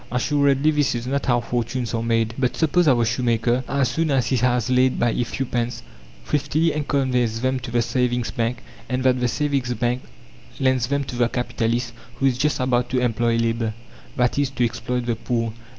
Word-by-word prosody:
Assuredly 140 Hz, +3 st, +2 dB
this 145 Hz, -4 st, +1 dB
is 120 Hz, 0 st, -4 dB
not 140 Hz, +2 st, -2 dB
how 120 Hz, -2 st, +3 dB
fortunes 120 Hz, +1 st, -2 dB
are 115 Hz, -, 0 dB
made. 115 Hz, -1 st, +1 dB
But 125 Hz, -2 st, 0 dB
suppose 165 Hz, +2 st, +2 dB
our 120 Hz, -4 st, +4 dB
shoemaker, 120 Hz, +1 st, +1 dB
as 140 Hz, -3 st, +1 dB
soon 160 Hz, +5 st, 0 dB
as 135 Hz, -3 st, +2 dB
he 130 Hz, -, +1 dB
has 125 Hz, -1 st, +1 dB
laid 130 Hz, 0 st, +2 dB
by 120 Hz, -1 st, +2 dB
a 120 Hz, -, 0 dB
few 135 Hz, +3 st, -3 dB
pence, 120 Hz, -1 st, -3 dB, 0.4 s
thriftily 150 Hz, +3 st, +1 dB, 0.2 s
conveys 125 Hz, -5 st, 0 dB
them 130 Hz, 0 st, 0 dB
to 120 Hz, -, -7 dB
the 120 Hz, 0 st, +1 dB
savings 125 Hz, 0 st, 0 dB
bank 115 Hz, +1 st, -2 dB, 0.3 s
and 130 Hz, 0 st, -1 dB
that 130 Hz, -1 st, +3 dB
the 125 Hz, -, +1 dB
savings 135 Hz, -2 st, -1 dB
bank 120 Hz, +2 st, -1 dB, 0.6 s
lends 130 Hz, -2 st, +2 dB
them 140 Hz, +1 st, 0 dB
to 125 Hz, -, -7 dB
the 120 Hz, -1 st, +2 dB
capitalist 120 Hz, 0 st, -1 dB, 0.2 s
who 135 Hz, -, -1 dB
is 130 Hz, -2 st, +2 dB
just 150 Hz, +2 st, +1 dB
about 125 Hz, -1 st, +1 dB
to 130 Hz, -, +1 dB
"employ 120 Hz, -1 st, +1 dB
labour," 115 Hz, -1 st, 0 dB, 0.4 s
i.e., 125 Hz, +3 st, +2 dB
to 125 Hz, -2 st, 0 dB
exploit 120 Hz, +1 st, -3 dB
the 120 Hz, -1 st, 0 dB
poor. 115 Hz, -1 st, -2 dB
125 Hz, 195 wpm, -22 LUFS, 120-130 Hz, 0.6 s, our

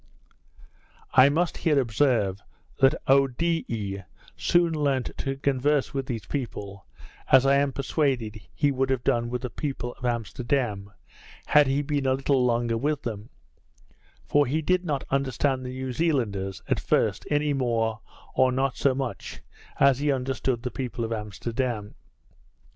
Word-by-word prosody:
I 130 Hz, +1 st, +7 dB
must 165 Hz, +4 st, 0 dB
here 150 Hz, -4 st, +2 dB
observe, 115 Hz, -5 st, +1 dB, 0.4 s
that 135 Hz, +3 st, +5 dB
Oedidee 135 Hz, -7 st, +1 dB, 0.3 s
soon 175 Hz, -1 st, +2 dB
learnt 140 Hz, -5 st, 0 dB
to 135 Hz, 0 st, -2 dB
converse 140 Hz, +1 st, +1 dB
with 135 Hz, -1 st, -3 dB
these 115 Hz, -6 st, -4 dB
people, 100 Hz, -7 st, -5 dB, 0.4 s
as 130 Hz, 0 st, +7 dB
I 140 Hz, 0 st, +5 dB
am 140 Hz, 0 st, +2 dB
persuaded, 130 Hz, -6 st, -1 dB
he 145 Hz, -1 st, +2 dB
would 135 Hz, 0 st, 0 dB
have 130 Hz, -2 st, 0 dB
done 120 Hz, 0 st, +1 dB
with 125 Hz, +1 st, -4 dB
the 125 Hz, -, -4 dB
people 125 Hz, -2 st, -4 dB
of -, -, -17 dB
Amsterdam, 120 Hz, -3 st, -1 dB, 0.5 s
had 150 Hz, -1 st, +5 dB
he 140 Hz, +2 st, +1 dB
been 145 Hz, -2 st, -1 dB
a 130 Hz, -, +3 dB
little 135 Hz, -1 st, +1 dB
longer 120 Hz, -1 st, +1 dB
with 150 Hz, +2 st, -1 dB
them; 110 Hz, -1 st, -5 dB, 1.0 s
for 145 Hz, -2 st, +3 dB
he 155 Hz, +5 st, -1 dB
did 180 Hz, +3 st, +2 dB
not 145 Hz, -6 st, -2 dB
understand 135 Hz, -1 st, 0 dB
the 125 Hz, -, -5 dB
New 130 Hz, 0 st, -4 dB
Zealanders, 110 Hz, -, -1 dB
at -, -, +1 dB
first, -, -, 0 dB
any 145 Hz, 0 st, +1 dB
more, 115 Hz, -4 st, 0 dB, 0.3 s
or 130 Hz, 0 st, +3 dB
not 130 Hz, 0 st, 0 dB
so 135 Hz, -2 st, +2 dB
much, 135 Hz, -2 st, -5 dB, 0.4 s
as 135 Hz, -1 st, +5 dB
he 145 Hz, 0 st, +1 dB
understood 130 Hz, -2 st, -1 dB
the 125 Hz, -, -3 dB
people 120 Hz, -3 st, -3 dB
of 115 Hz, -, -3 dB
Amsterdam. 110 Hz, +1 st, -3 dB
130 Hz, 150 wpm, -26 LUFS, 115-140 Hz, 1.0 s, I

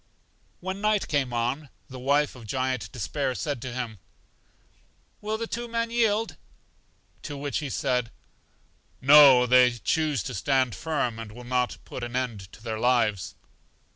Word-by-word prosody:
When 190 Hz, +2 st, -4 dB
night 210 Hz, -1 st, +1 dB
came 140 Hz, -4 st, 0 dB
on, 125 Hz, +5 st, -2 dB, 0.2 s
the 130 Hz, -1 st, -9 dB
wife 140 Hz, +3 st, +1 dB
of 120 Hz, -3 st, -12 dB
Giant 130 Hz, -3 st, -2 dB
Despair 130 Hz, +2 st, -2 dB
said 145 Hz, -4 st, -3 dB
to 130 Hz, -, -5 dB
him: 120 Hz, -4 st, -5 dB, 1.2 s
Well, 215 Hz, +1 st, -3 dB
will -, -, 0 dB
the 230 Hz, -, -3 dB
two 240 Hz, +1 st, -4 dB
men 230 Hz, 0 st, -2 dB
yield? 225 Hz, -2 st, +1 dB, 0.8 s
To 145 Hz, -2 st, -6 dB
which 140 Hz, -2 st, -2 dB
he 150 Hz, -, -4 dB
said: 125 Hz, -2 st, 0 dB, 0.9 s
No; 135 Hz, -2 st, +8 dB
they 125 Hz, 0 st, +6 dB
choose 150 Hz, -, 0 dB
to -, -, -5 dB
stand 130 Hz, +3 st, +1 dB
firm, 140 Hz, -8 st, -2 dB
and 115 Hz, -2 st, -7 dB
will 120 Hz, +3 st, -11 dB
not 125 Hz, 0 st, -1 dB
put 125 Hz, -, -7 dB
an 120 Hz, 0 st, -5 dB
end 115 Hz, -7 st, -3 dB
to 110 Hz, -, -15 dB
their 110 Hz, -2 st, -3 dB
lives. 115 Hz, -5 st, +1 dB
130 Hz, 160 wpm, -26 LUFS, 120-150 Hz, 1.2 s, No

